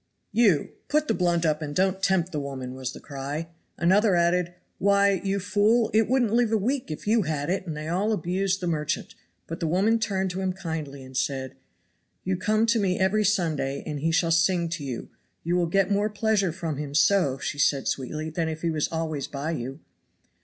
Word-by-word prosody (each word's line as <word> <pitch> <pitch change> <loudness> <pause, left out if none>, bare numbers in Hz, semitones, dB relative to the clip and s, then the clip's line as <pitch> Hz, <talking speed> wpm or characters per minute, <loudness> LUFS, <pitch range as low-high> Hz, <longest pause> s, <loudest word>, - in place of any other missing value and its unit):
" - - -49
you, 180 -10 +3 0.2
put 305 +1 +1
the - - +2
blunt 175 -2 +1
up 155 0 +1
and 145 -1 -5
don't 190 0 +1
tempt 190 -2 +1
the 150 - -2
woman," 135 -3 -5
was 130 -1 -4
the - - -10
cry. 145 +3 -5 0.3
Another 190 +3 +4
added: 175 0 +1 0.2
"Why, 200 -1 +3
you 195 0 0
fool, 210 +4 +2
it 220 0 +4
wouldn't 245 -4 +2
live 235 -1 +3
a 225 - +3
week 245 - -1
if 155 - -6
you 220 +2 +3
had 155 -2 -2
it," 190 0 -2
and 155 -2 -4
they 155 +1 -5
all 190 +6 0
abused 190 0 0
the 180 - -2
merchant. 150 -3 -2 0.3
But 165 - -6
the 165 - -1
woman 200 +8 +2
turned 195 -4 -1
to 185 +2 -4
him 190 -1 0
kindly 160 -7 -5
and 130 0 -12
said: 130 0 -1 0.7
"You 190 0 0
come 215 +4 +1
to 230 0 +2
me 185 -3 +1
every 195 +3 +2
Sunday, 160 -9 0
and 150 -2 -4
he 165 +3 0
shall 165 0 +2
sing 170 +1 +2
to 165 -3 -4
you. 130 -4 -5 0.3
You 170 +2 0
will 175 -1 +2
get 195 +3 +2
more 205 +1 +2
pleasure 205 -3 +1
from 160 -4 -4
him 145 -1 -5
so," 150 -4 +3
said - - -11
she, 145 - -3 0.3
sweetly, 155 +4 -4
"than 160 0 -1
if 160 +1 -6
he 170 - +1
was 155 -2 0
always 160 -4 -2
by 145 +3 -4
you." 135 0 -5
175 Hz, 215 wpm, -26 LUFS, 155-200 Hz, 0.7 s, Another